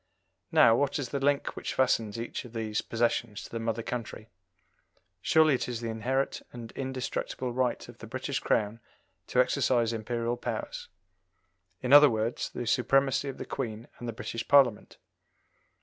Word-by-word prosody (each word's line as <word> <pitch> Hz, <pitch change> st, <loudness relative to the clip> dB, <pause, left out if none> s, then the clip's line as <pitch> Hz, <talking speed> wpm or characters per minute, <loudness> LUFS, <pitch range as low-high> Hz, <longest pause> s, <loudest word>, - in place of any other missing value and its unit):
Now, 115 Hz, -, +6 dB
what 140 Hz, +3 st, +1 dB
is 135 Hz, -4 st, -3 dB
the 140 Hz, -, -2 dB
link 140 Hz, +1 st, +1 dB
which -, -, -4 dB
fastens 115 Hz, -4 st, +1 dB
each 115 Hz, -, -4 dB
of 120 Hz, -2 st, -12 dB
these 110 Hz, -2 st, -2 dB
possessions 115 Hz, -2 st, -1 dB
to -, -, -11 dB
the 115 Hz, -, -3 dB
mother 115 Hz, 0 st, -2 dB
country? 115 Hz, -2 st, -6 dB, 0.9 s
Surely 155 Hz, -2 st, +4 dB
it 125 Hz, -, -1 dB
is 120 Hz, -2 st, -3 dB
the 115 Hz, -1 st, -3 dB
inherent 130 Hz, +5 st, -1 dB
and 120 Hz, -1 st, -9 dB
indestructible 130 Hz, -1 st, -4 dB
right 125 Hz, -1 st, -1 dB
of -, -, -13 dB
the -, -, -9 dB
British -, -, -3 dB
Crown 105 Hz, +1 st, 0 dB, 0.5 s
to 125 Hz, -, 0 dB
exercise 125 Hz, -3 st, +2 dB
Imperial 115 Hz, +1 st, -2 dB
powers -, -, -5 dB, 1.0 s
in 125 Hz, +2 st, +2 dB
other 145 Hz, 0 st, +10 dB
words, 110 Hz, 0 st, -1 dB
the 120 Hz, -, -5 dB
supremacy 135 Hz, +4 st, +2 dB
of 135 Hz, -, -7 dB
the -, -, -6 dB
Queen 115 Hz, -3 st, -5 dB
and 120 Hz, -, -6 dB
the -, -, -2 dB
British 115 Hz, +1 st, -5 dB
Parliament? 135 Hz, -6 st, +4 dB
120 Hz, 165 wpm, -29 LUFS, 115-130 Hz, 1.0 s, other